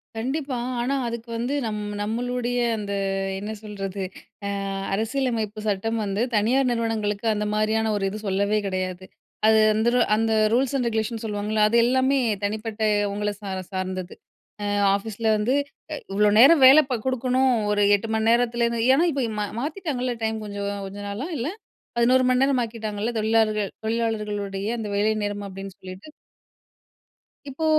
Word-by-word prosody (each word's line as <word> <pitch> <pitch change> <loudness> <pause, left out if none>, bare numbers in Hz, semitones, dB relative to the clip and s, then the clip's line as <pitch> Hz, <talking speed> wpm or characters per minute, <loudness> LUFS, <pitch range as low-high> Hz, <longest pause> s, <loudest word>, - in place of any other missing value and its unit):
கண்டிப்பா. 265 +3 -2 0.2
ஆனா 260 +3 0
அதுக்கு 235 0 -6
வந்து 245 +4 -2
நம் 210 -1 -3 0.2
நம்மளுடைய 245 +3 -1 0.2
அந்த 205 -1 -5 0.5
என்ன 205 +2 -5
சொல்றது, 195 -2 -5 0.4
அ - - -2 0.4
அரசியலமைப்பு 225 -1 -1
சட்டம் 220 +3 0
வந்து 200 +2 -1
தனியார் 250 +5 +3
நிறுவனங்களுக்கு 225 -2 -1
அந்த 210 0 -2
மாரியான 220 +1 +1
ஒரு 200 - -2
இது 215 +2 -6
சொல்லவே 200 +2 +1
கிடையாது. 185 -1 -3 0.4
அது 220 0 +6
அந்தரு 235 +3 +2 0.2
அந்த 225 +1 +1 0.2
ரூல்ஸ் 260 +2 +2
அண்ட் 245 -3 0
ரெகுலேஷன் 225 0 -2
சொல்லுவாங்கல்ல. 210 0 +1
அது 235 - 0
எல்லாமே 260 +2 +2 0.2
தனிப்பட்ட 215 +1 -3 0.3
உங்கள 210 0 -1
சார 195 -2 -4 0.2
சார்ந்தது. 185 -1 -4 0.5
அ - - -2 0.3
ஆஃபீஸில 220 +2 -3
வந்து 215 +5 +1 0.4
இ - - -2 0.2
இவ்ளோ 210 +1 +4
நேரம் 280 +4 +8
வேல 270 +4 +9
ப 255 - 0
குடுக்கணும் 260 +1 +2 0.2
ஒரு 205 0 +2
8 225 +3 -4
மணி 220 0 +1
நேரத்துலேந்து. 235 0 +2
ஏன்னா, 310 - +4
இப்ப 275 -1 -1 0.2
மா 210 - 0 0.2
மாத்திட்டாங்கல்ல 290 -6 -2
டைம் 220 0 0
கொஞ்சம் 200 0 -4 0.2
கொஞ்ச 195 +1 -8
நாளா 220 +9 -4
இல்ல? 245 +5 -2 0.5
11 255 +2 +4
மணி 255 0 +3
நேரம் 270 -2 +2
ஆக்கிட்டாங்கல்ல? 220 -1 -3
தொழிலாளர்கள் 215 -2 +2 0.2
தொழிலாளர்களுடைய 210 -3 -2
அந்த 215 - -4
வேலை 210 +2 +2
நேரம் 205 0 -3
அப்படின்னு 195 0 -8
சொல்லிட்டு? 185 +9 -10 1.4
இப்போ, 300 +4 -3
220 Hz, 145 wpm, -24 LUFS, 205-245 Hz, 1.4 s, வேல